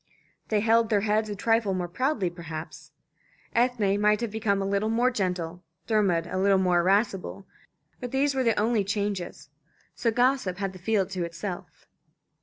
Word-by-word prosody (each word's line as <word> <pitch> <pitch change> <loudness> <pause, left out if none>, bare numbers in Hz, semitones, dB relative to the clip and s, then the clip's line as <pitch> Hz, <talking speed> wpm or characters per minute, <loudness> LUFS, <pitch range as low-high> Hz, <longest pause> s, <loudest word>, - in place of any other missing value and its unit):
They 215 -2 +1
held 225 0 +3
their 205 -2 +2
heads 215 +1 +1
a 205 - -3
trifle 225 -1 +1
more 180 -1 -2
proudly 215 - -1
perhaps. 165 -2 -8 0.6
Ethne 225 -5 +2
might 210 0 +4
have 235 -3 -2
become 215 -2 0
a 195 - -1
little 200 +2 0
more 240 +3 +2
gentle, 180 -5 -2 0.2
Dermod 195 -7 +2
a 185 +2 -3
little 195 0 +4
more 180 -2 +3
irascible, 195 +1 0 0.5
but 245 - -5
these 275 +3 +1
were 265 -1 0
the 230 -3 +2
only 220 -1 +2
changes. 200 -7 -3 0.4
So 235 - 0
gossip 245 -5 +1
had 195 -1 -3
the 185 - -11
field 195 0 0
to 185 -2 -2
itself. 170 +2 -7
205 Hz, 170 wpm, -27 LUFS, 185-225 Hz, 0.6 s, might